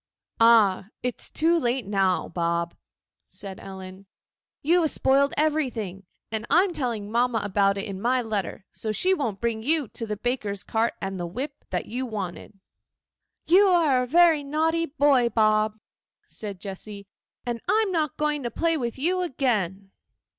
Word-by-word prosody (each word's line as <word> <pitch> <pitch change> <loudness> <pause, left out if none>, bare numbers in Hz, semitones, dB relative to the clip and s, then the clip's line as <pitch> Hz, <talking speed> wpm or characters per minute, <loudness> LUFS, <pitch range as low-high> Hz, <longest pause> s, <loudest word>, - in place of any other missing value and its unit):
'Ah! 220 -5 +5 0.2
it 250 0 0
is - - -7
too 335 +2 +2
late 245 -3 -1
now, 195 -2 +1
Bob,' 170 0 -1 0.5
said 195 -2 -9
Ellen; 190 0 -10 0.6
'you 345 +4 +4
have 320 - +2
spoiled 280 +1 +3
everything; 240 - -1 0.2
and 220 -1 -3
I 350 - +5
am 385 -3 -2
telling 230 -8 -3
mamma 240 0 +2
all 215 - -1
about 200 0 +2
it 195 - -3
in 195 -3 -6
my 250 +3 +2
letter, 210 -5 -3
so 220 - -4
she 365 - +2
won't 235 - -2
bring 230 -1 -1
you 295 0 +1
the 215 -3 -5
baker's 210 -4 -2
cart 225 +2 0
and 195 -1 -4
the 175 - -3
whip 270 - -6
that - - -2
you 250 +3 -4
wanted.' 200 -2 -6 0.9
You 390 +4 +6
are 320 -8 +4
a 250 - -2
very 330 0 +5
naughty 320 +3 0
boy, 275 -5 +3
Bob,' 215 -1 +2 0.5
said 200 -4 -7
Jessy, 200 +1 -8 0.4
'and 240 -2 -3
I 440 +1 +4
am 390 - -3
not 310 -5 -1
going 300 -1 0
to 240 - -3
play 330 +7 0
with 240 -3 -3
you 360 +7 +1
again. 210 - -1
235 Hz, 170 wpm, -25 LUFS, 200-295 Hz, 0.9 s, You